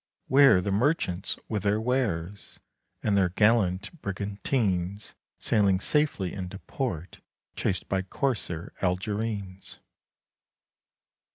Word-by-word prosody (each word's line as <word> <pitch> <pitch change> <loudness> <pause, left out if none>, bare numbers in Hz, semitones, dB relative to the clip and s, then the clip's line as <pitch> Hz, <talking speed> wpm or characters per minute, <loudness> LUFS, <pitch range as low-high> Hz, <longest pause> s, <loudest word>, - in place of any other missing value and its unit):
Where 135 -8 +6
the 100 - -2
merchants 100 - 0
with 105 -3 -2
their 105 +2 +1
wares, 105 -6 -2 0.4
45 - - -4
And 105 - +3
their 95 -2 +3
gallant 105 - +2
brigantines 100 -1 -2 0.2
Sailing 100 -4 +2
safely 145 - +1
into 95 0 -6
port 90 - -4 0.4
Chased 95 - -1
by 95 -1 0
corsair 95 - -3
Algerines? 100 +1 -2
100 Hz, 100 wpm, -27 LUFS, 95-110 Hz, 0.4 s, Where